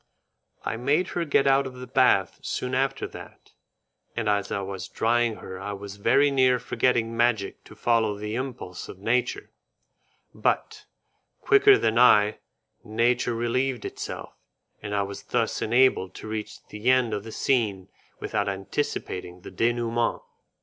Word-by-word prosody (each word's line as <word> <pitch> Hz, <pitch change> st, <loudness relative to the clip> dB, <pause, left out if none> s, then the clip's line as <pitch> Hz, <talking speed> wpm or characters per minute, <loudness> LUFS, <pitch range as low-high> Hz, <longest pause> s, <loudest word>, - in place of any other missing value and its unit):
I 115 Hz, -, -2 dB
made 145 Hz, +9 st, +1 dB
her 175 Hz, -1 st, -2 dB
get 140 Hz, -2 st, +2 dB
out 135 Hz, 0 st, +3 dB
of 130 Hz, -, -9 dB
the 125 Hz, 0 st, -8 dB
bath 125 Hz, -6 st, +2 dB
soon 125 Hz, 0 st, -3 dB
after 135 Hz, +1 st, 0 dB
that, -, -, -13 dB, 0.6 s
and 115 Hz, -2 st, -2 dB
as 100 Hz, -1 st, 0 dB
I 100 Hz, -, -1 dB
was 95 Hz, -2 st, -6 dB
drying 115 Hz, 0 st, +1 dB
her 95 Hz, -2 st, -9 dB
I 105 Hz, +1 st, -5 dB
was 100 Hz, 0 st, -8 dB
very 140 Hz, +7 st, +3 dB
near 130 Hz, -2 st, +4 dB
forgetting 120 Hz, -2 st, 0 dB
magic 115 Hz, -4 st, 0 dB
to -, -, -14 dB
follow 110 Hz, -3 st, +1 dB
the 105 Hz, +1 st, -5 dB
impulse 120 Hz, -8 st, -5 dB
of -, -, -9 dB
nature, 120 Hz, +5 st, -1 dB, 0.8 s
but, -, -, -1 dB, 0.5 s
quicker 410 Hz, -1 st, +6 dB
than 110 Hz, +1 st, +1 dB
I, 105 Hz, -4 st, +5 dB, 0.4 s
nature 120 Hz, +2 st, +1 dB
relieved 120 Hz, +1 st, -1 dB
itself, -, -, -6 dB, 0.5 s
and 105 Hz, -1 st, -4 dB
I 100 Hz, -, +1 dB
was 100 Hz, 0 st, -7 dB
thus 115 Hz, -3 st, -1 dB
enabled 120 Hz, -5 st, +2 dB
to -, -, -8 dB
reach 110 Hz, -1 st, -6 dB
the 105 Hz, +4 st, -2 dB
end 130 Hz, -3 st, +3 dB
of 105 Hz, -1 st, -3 dB
the 110 Hz, -, -9 dB
scene 105 Hz, -8 st, 0 dB, 0.3 s
without 100 Hz, 0 st, -1 dB
anticipating 95 Hz, -3 st, -4 dB
the -, -, -10 dB
denouement. 120 Hz, 0 st, 0 dB
115 Hz, 150 wpm, -26 LUFS, 105-125 Hz, 0.8 s, quicker